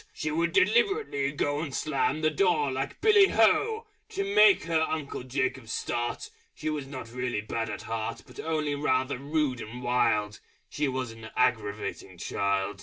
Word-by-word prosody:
She 155 - -3
would 170 +2 +1
deliberately 220 - +2
go 145 0 -1
And 145 -5 -4
Slam 150 0 0
the 155 0 +2
door 155 -5 +2
like 135 +1 -4
Billy 420 -2 +6
Ho! 435 - +3 0.2
To 195 - -2
make 210 -1 +7
her 165 -1 +1
Uncle 155 -4 -2
Jacob 130 -2 -2
start. 120 +1 -3 0.2
She 155 - -3
was 145 -3 -4
not 130 -4 -8
really 125 -3 -2
bad 115 +1 -3
at 105 - -5
heart, 110 -1 -4
But - - -14
only 155 -2 -1
rather 130 -2 0
rude 140 -3 -1
and 120 +3 -8
wild: 110 -4 +1 0.3
She 150 0 -1
was 130 -3 -3
an 115 -1 -10
aggravating 105 -5 -1
child.... 100 +2 -1
135 Hz, 165 wpm, -28 LUFS, 120-160 Hz, 0.3 s, make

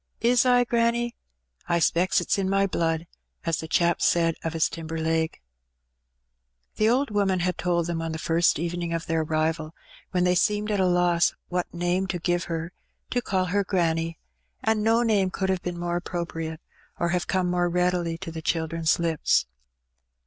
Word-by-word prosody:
"Is 240 +2 +4
I, 245 0 +5
granny? 235 0 +1 0.6
I 170 - +3
specks 170 +2 +2
it^s - - 0
in 190 -1 0
my 195 0 +3
blood, 165 -3 -1 0.4
as 165 -1 +1
the 160 - -5
chap 170 +1 +2
said 165 -1 +3
o' 165 - 0
his 160 -1 +1
timber 165 0 -6
leg.^^ 160 0 0 1.4
The 215 +1 +3
old 260 +1 +1
woman 195 -3 +1
had 180 +1 0
told 170 -1 +1
them 170 -1 -2
on 165 0 -3
the 160 - -3
first 165 +2 +2
evening 170 +1 -3
of 165 - -4
their 165 -1 0
arrival, 155 0 -1 0.3
when 180 -1 +1
they 180 0 +3
seemed 210 +4 +1
at 205 - +1
a 185 - +3
loss 175 -1 +3
what 180 0 -2
name 175 +2 0
to 190 - -2
give 175 +1 0
her, 165 +1 -4 0.4
to 245 - +1
call 190 -5 0
her 200 +3 +1
granny; 165 -4 0 0.5
and 220 -1 +2
no 225 +2 +3
name 205 -5 +2
could 190 +1 -2
have 190 -1 0
been 175 -1 -4
more 175 0 -1
appropriate, 165 -2 -4 0.4
or 170 - +1
have 175 0 -1
come 185 -1 +1
more 175 0 +1
readily 180 -1 0
to 170 -2 -7
the 160 0 -6
children's 160 0 0
Ups. 165 - +2
175 Hz, 185 wpm, -25 LUFS, 165-190 Hz, 1.4 s, I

